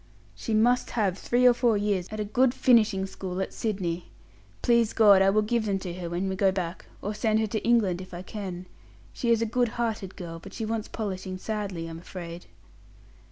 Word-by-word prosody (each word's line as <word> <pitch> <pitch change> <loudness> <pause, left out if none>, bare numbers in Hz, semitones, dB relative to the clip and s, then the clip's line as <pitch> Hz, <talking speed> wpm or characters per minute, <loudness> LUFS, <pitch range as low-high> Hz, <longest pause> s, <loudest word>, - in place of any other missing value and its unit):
"She 225 - -3
must 240 +3 +3
have 200 -5 +2
three 245 +5 +1
or 250 - +8
four 235 -3 +2
years 200 -3 0
at 215 - -6
a 210 - -1
good 250 +4 +2
finishing 215 -7 +4
school 190 -1 -5
at 190 - -3
Sydney. 180 -6 -3 0.5
Please 235 -2 +3
God, 205 -4 +7
I 195 - +5
will 215 +2 +3
give 225 +1 0
them 195 -1 +1
to 185 -2 -5
her 175 -1 -5
when 175 +3 -2
we 190 - -2
go 195 0 +3
back 185 -2 -4 0.2
or 205 - -2
send 215 +1 +1
her 220 - +2
to 215 0 -3
England 210 -7 +2
if 185 - -10
I 175 0 -7
can. 185 -3 -6 0.5
She 235 - -2
is 230 -1 +4
a - - +1
good 245 +2 +1
hearted 220 -5 -2
girl, 165 -2 -7
but 195 +3 -11
she 225 - -3
wants 220 -1 -2
polishing 190 -3 -4
sadly, 200 -4 -4
I'm 165 0 -7
afraid." 170 -1 -8
205 Hz, 210 wpm, -27 LUFS, 185-225 Hz, 0.5 s, or